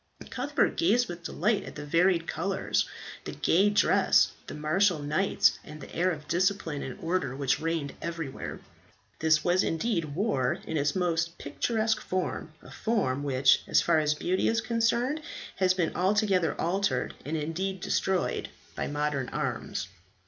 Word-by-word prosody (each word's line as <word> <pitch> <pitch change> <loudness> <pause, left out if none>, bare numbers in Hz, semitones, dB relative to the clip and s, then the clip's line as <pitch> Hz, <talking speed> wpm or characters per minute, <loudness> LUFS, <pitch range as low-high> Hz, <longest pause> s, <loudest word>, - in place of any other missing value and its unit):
Cuthbert 280 +4 0
gazed 245 -7 +3
with 175 -1 -7
delight 200 +4 0
at - - -9
the 145 - -6
varied 170 +2 +3
colours, 190 +4 -1 0.4
the - - -5
gay 195 +5 +3
dresses, 205 - +4 0.2
the - - -6
martial 165 +5 +2
knights, 150 +7 +2
and 150 +1 -10
the - - -11
air 180 +2 +2
of 150 -3 -7
discipline 175 -4 0
and 130 - -6
order 165 -6 -1
which 135 -1 +1
reigned 160 -3 -2
everywhere. 165 -5 -5 0.6
This 155 -1 +3
was 180 +1 +3
indeed 165 -4 -1
war 170 - +1
in 160 - -4
its 145 -1 +1
most 170 -2 0
picturesque 220 +8 -1
form, 185 -3 -3
a - - -13
form 195 - 0
which, 135 -1 +4
as - - +4
far 165 -2 +3
as 150 0 +1
beauty 180 +5 0
is 225 - +2
concerned, 235 +6 0 0.4
has 185 -1 +3
been 175 -3 -1
altogether 190 -2 +2
altered, 190 +4 0
and 155 +3 -2
indeed 180 +5 -3
destroyed, 185 +1 0 0.3
by - - -2
modern 145 -3 -1
arms. - - -3
170 Hz, 155 wpm, -28 LUFS, 150-195 Hz, 0.6 s, dresses